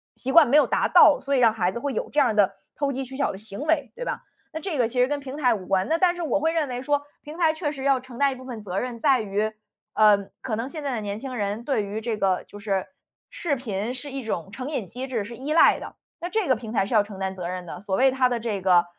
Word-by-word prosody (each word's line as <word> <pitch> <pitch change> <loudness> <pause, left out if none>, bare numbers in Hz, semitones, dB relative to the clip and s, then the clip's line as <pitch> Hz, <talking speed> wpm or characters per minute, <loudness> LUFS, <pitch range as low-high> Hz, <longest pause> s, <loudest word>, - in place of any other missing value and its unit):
习 260 - -4
惯 310 0 +7
没 290 - +6
有 300 - +6
达 - - +1
到， - - +7
所 280 0 0
以 - - +3
让 230 -3 +5
孩 185 -5 0
子 235 - -5
会 280 +2 -2
有 - - -3
这 295 - +1
样 275 - +5
儿 220 - -1
的 200 -2 +4 0.2
投 285 -1 0
机 265 +1 -3
取 265 +1 -10
巧 280 - +1
的 190 - -8
行 210 +3 -9
为， 295 -6 0
对 - - -5
吧？ - - -4 0.3
那 315 - -3
这 370 -6 -3
个 240 -3 +3
其 250 +2 -3
实 250 - +4
跟 290 0 -1
平 275 -1 -7
台 250 -5 +3
无 190 -4 -6
关， 190 +1 +1
那 325 - +3
但 360 -1 +3
是 350 - -6
我 300 - +1
会 320 +2 +1
认 320 -3 +1
为 250 0 -4
说， 285 +2 0 0.2
平 300 +3 -10
台 325 -3 +3
确 315 -2 -2
实 270 - -7
要 275 -2 +3
承 250 -1 -12
担 280 +1 +3
一 - - -5
部 260 - -11
分 240 -4 -7
责 190 -1 -2
任 245 0 -4
在 275 -4 +4
于， 210 +1 -1 0.4
呃， 205 -2 +4
可 225 - -2
能 230 +3 -3
现 305 0 -7
在 270 -3 -1
的 220 - -3
年 205 0 -4
轻 260 +1 -6
人 210 0 -2
对 270 -7 +1
于 205 +2 -4
这 230 0 -2
个， 190 -3 +1
就 205 - -12
是， 195 -2 -1 0.4
视 315 -5 -1
频 220 -2 -3
是 270 +2 -7
一 270 -2 -5
种 195 -4 -4
成 255 +3 -5
瘾 240 -11 -3
机 255 +4 -6
制， 235 -6 -2
是 235 +3 -8
依 275 +4 -5
赖 330 - +6
的。 - - -9 0.3
那 350 - -2
这 415 -1 0
个 260 - +4
平 220 -1 -8
台 195 - +2
是 215 - -5
要 215 - +6
承 205 -1 -10
担 190 0 -2
责 180 -2 -5
任 180 0 -5
的， 175 - -7
所 195 -2 -2
谓 265 +6 +5
它 260 -1 +3
的 240 -1 -1
这 220 -4 -3
个， 180 -2 +4
245 Hz, 330 characters per minute, -25 LUFS, 205-280 Hz, 0.4 s, 惯